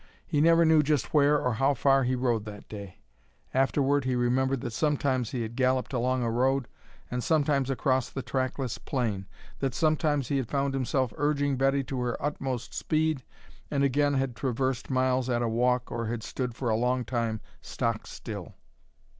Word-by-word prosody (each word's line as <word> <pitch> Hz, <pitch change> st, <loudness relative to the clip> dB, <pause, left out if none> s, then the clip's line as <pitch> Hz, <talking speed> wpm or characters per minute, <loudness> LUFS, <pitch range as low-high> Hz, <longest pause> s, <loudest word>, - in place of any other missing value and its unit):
He 150 Hz, -3 st, +1 dB
never 165 Hz, +1 st, +5 dB
knew 160 Hz, -1 st, +6 dB
just 150 Hz, -2 st, 0 dB
where 150 Hz, 0 st, +5 dB
or 125 Hz, -3 st, 0 dB
how 135 Hz, +5 st, +2 dB
far 135 Hz, +1 st, +3 dB
he 130 Hz, +1 st, +1 dB
rode 120 Hz, -4 st, 0 dB
that 105 Hz, -1 st, -9 dB
day. 100 Hz, -3 st, -9 dB, 0.6 s
Afterward 135 Hz, +2 st, +2 dB
he 130 Hz, -1 st, 0 dB
remembered 130 Hz, +2 st, +1 dB
that 120 Hz, -, -4 dB
sometimes 135 Hz, -4 st, +1 dB
he 120 Hz, -2 st, -2 dB
had 115 Hz, +1 st, -6 dB
galloped 130 Hz, 0 st, +1 dB
along 125 Hz, +1 st, +1 dB
a 115 Hz, -, 0 dB
road 130 Hz, +2 st, +1 dB, 0.4 s
and 125 Hz, 0 st, -2 dB
sometimes 145 Hz, -4 st, +2 dB
across 130 Hz, -1 st, +1 dB
the 135 Hz, -, -5 dB
trackless 130 Hz, -1 st, -2 dB
plain, 110 Hz, -8 st, -2 dB, 0.3 s
that 135 Hz, -3 st, -1 dB
sometimes 155 Hz, -4 st, +1 dB
he 140 Hz, -, +1 dB
had 130 Hz, -4 st, -2 dB
found 140 Hz, -1 st, 0 dB
himself 130 Hz, -2 st, 0 dB
urging 145 Hz, -1 st, +1 dB
Betty 135 Hz, +1 st, +2 dB
to 130 Hz, 0 st, -4 dB
her 120 Hz, -1 st, -1 dB
utmost 135 Hz, -4 st, -3 dB
speed 155 Hz, -2 st, 0 dB, 0.5 s
and 140 Hz, -1 st, +1 dB
again 145 Hz, +1 st, +2 dB
had 135 Hz, -2 st, -1 dB
traversed 130 Hz, +1 st, -1 dB
miles 130 Hz, -1 st, +1 dB
at 120 Hz, -1 st, +1 dB
a -, -, +1 dB
walk 125 Hz, +2 st, +1 dB
or 115 Hz, -1 st, -2 dB
had 115 Hz, -1 st, -3 dB
stood 125 Hz, -2 st, -4 dB
for 125 Hz, -2 st, -2 dB
a -, -, +3 dB
long 125 Hz, +2 st, +1 dB
time 115 Hz, -2 st, -1 dB, 0.2 s
stock -, -, -2 dB
still. -, -, -7 dB
130 Hz, 180 wpm, -28 LUFS, 120-140 Hz, 0.6 s, knew